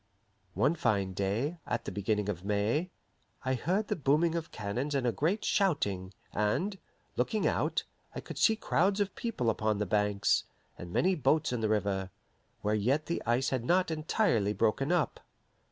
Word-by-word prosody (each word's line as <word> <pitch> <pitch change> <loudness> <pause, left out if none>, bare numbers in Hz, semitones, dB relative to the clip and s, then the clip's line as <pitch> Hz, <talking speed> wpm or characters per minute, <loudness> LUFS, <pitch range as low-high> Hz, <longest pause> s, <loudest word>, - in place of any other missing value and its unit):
One 140 +4 +3
fine 105 - 0
day, 110 - -1
at - - -2
the - - -4
beginning 105 0 -1
of 95 -4 -3
May, 105 - 0 0.6
I 130 - +1
heard 185 - 0
the - - 0
booming 155 +3 +2
of 165 -1 -3
cannons 120 +8 -3
and 135 -2 0
a 120 - +3
great 165 - 0
shouting, 100 - +1 0.2
and, 175 - 0 0.4
looking 205 - 0
out, - - +1 0.3
I - - -3
could - - -8
see 220 - +5
crowds 200 -2 +1
of 200 -2 0
people 130 - -1
upon 110 -1 0
the 105 - -1
banks, 105 0 +2 0.3
and 85 - -9
many 185 - +3
boats 155 -3 +2
in 120 - -1
the 110 - +1
river, 100 -3 0 0.5
where 105 - 0
yet 130 +9 +1
the 170 - -2
ice 125 +3 +2
had 130 -3 -1
not 180 +6 +2
entirely 155 - +1
broken 120 - +1
up. 175 -5 +1
125 Hz, 170 wpm, -31 LUFS, 105-170 Hz, 0.6 s, see